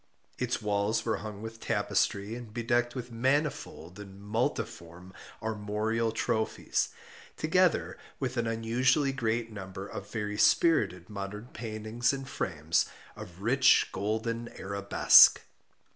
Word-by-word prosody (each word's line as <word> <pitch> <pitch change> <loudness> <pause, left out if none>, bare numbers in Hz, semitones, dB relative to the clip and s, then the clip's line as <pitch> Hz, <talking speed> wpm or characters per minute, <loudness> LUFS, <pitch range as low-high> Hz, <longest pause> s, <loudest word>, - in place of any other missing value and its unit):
Its 125 -2 -2
walls 105 +2 0
were 110 - 0
hung 105 -1 -8
with 115 0 -8
tapestry 100 -1 0
and 115 -2 -9
bedecked 120 +1 0
with 125 -1 -6
manifold 130 - -1
and 100 -1 -11
multiform 100 - -4 0.3
armorial 110 +1 -1
trophies, 110 0 -1 0.5
together - - +1 0.2
with 130 -1 -2
an 120 -2 0
unusually 120 +5 +1
great 115 -3 -2
number 95 -1 -7
of 100 - -8
very 105 -1 -4
spirited 95 - +3
modern 105 +3 -7
paintings 115 +2 -2
in 135 0 -5
frames 80 - -1 0.3
of 95 -3 -11
rich 130 +3 +4
golden 110 +4 -2
arabesque. 100 +1 +6
110 Hz, 115 wpm, -29 LUFS, 100-120 Hz, 0.5 s, arabesque